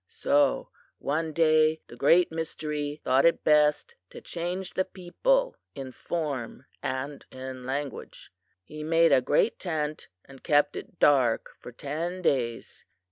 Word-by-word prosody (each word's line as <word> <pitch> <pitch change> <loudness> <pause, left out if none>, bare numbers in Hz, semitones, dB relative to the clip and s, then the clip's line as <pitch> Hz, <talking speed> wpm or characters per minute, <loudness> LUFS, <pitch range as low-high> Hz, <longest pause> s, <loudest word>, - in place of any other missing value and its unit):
So 145 -1 +1 0.3
one 160 +3 -2
day 155 0 +3
the - - -13
Great 165 +8 +4
Mystery 150 -2 -4
thought 130 +2 +3
it 170 - +3
best 150 - +3 0.2
to 475 -1 -10
change 180 - -4
the 185 - +1
people - - 0 0.2
in 135 -2 -6
form 135 -5 -4 0.2
and 135 +2 -4
in 130 -1 -8
language. 140 +1 -5 0.3
"He 150 +11 -9
made 165 +1 +4
a 130 - +5
great 145 - +1
tent 155 -4 -3 0.2
and 135 -1 -15
kept 145 -2 +2
it - - -9
dark 130 -6 +3
for - - -10
ten 165 +8 -4
days. 120 -7 -1
150 Hz, 135 wpm, -27 LUFS, 135-170 Hz, 0.3 s, a